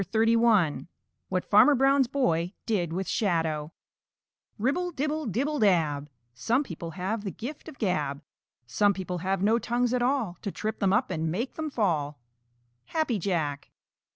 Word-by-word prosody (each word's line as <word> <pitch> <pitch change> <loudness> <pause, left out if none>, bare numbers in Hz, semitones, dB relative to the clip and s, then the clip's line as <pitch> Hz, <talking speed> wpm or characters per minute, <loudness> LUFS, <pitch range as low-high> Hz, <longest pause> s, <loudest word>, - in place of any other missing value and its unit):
CHAPTER 220 +3 +1
XXXI 225 -10 +3 0.4
WHAT 185 -1 -1
FARMER 245 +8 +6
BROWN'S 270 0 +4
BOY 180 -10 0
DID 180 -8 0
WITH 185 +3 -3
SHADOW 165 -7 0 0.9
Ribble, 285 - 0
dibble, 305 -1 -2
dibble, 280 +9 -1
dab! 155 -8 +2 0.2
Some 235 - +1
people 170 - -7
have 200 +4 -2
the 200 - -3
gift 280 - -7
of 290 - -13
gab! 150 - -1 0.4
Some 200 - +2
people 180 -2 -4
have 190 +2 -1
no 225 +3 +3
tongues 240 +1 0
at 250 - +1
all 245 -9 0
To 200 - -3
trip 215 +3 -4
them 195 -2 +2
up 220 +2 +1
and 160 -2 -1
make 225 +11 -2
them 315 -1 -4
fall. 155 - -1 0.7
_Happy 310 -9 0
Jack. 155 -7 -2
205 Hz, 155 wpm, -27 LUFS, 170-250 Hz, 0.9 s, FARMER